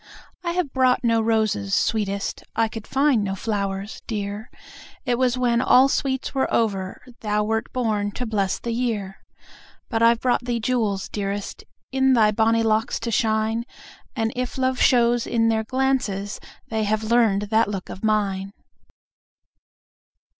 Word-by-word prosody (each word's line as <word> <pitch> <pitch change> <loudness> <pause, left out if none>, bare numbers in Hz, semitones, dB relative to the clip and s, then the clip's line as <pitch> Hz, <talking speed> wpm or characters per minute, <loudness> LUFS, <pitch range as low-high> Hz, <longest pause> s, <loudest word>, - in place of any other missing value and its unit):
I 340 -1 -1
have 350 -7 -2
brought 255 -1 +3
no 230 -1 +3
roses, 215 - +1
sweetest, 200 -2 -1
I 225 0 +2
could 220 0 -8
find 270 -5 +2
no 195 -1 -2
flowers, 200 -1 -3
dear,— 205 0 -4 0.6
It 245 -1 0
was 255 -1 +2
when 240 -1 +2
all 260 +1 +5
sweets 265 -1 -1
were 265 -1 0
over 195 -4 -1 0.2
Thou 210 -1 0
wert 220 +1 -2
born 215 -5 0
to 250 - -4
bless 200 -4 0
the 235 - -4
year. 225 -5 -2 0.7
But 225 -3 -1
I've 230 0 +5
brought 250 -1 +1
thee 240 -1 -1
jewels, 220 -5 0
dearest, 200 -1 -4 0.3
In 265 0 +3
thy 220 -3 +4
bonny 225 +1 +2
locks 220 0 +1
to 230 0 -3
shine,— 220 +1 +1 0.5
And 225 -2 -1
if 250 +2 -3
love 260 -1 0
shows 240 -1 +3
in 225 -1 +2
their 220 -1 +1
glances, 245 -6 -1 0.3
They 220 -1 -1
have 215 +1 0
learn'd 220 -3 +3
that 220 +1 +4
look 195 -3 -5
of 190 - -9
mine! 200 -2 0
225 Hz, 155 wpm, -23 LUFS, 205-245 Hz, 0.7 s, all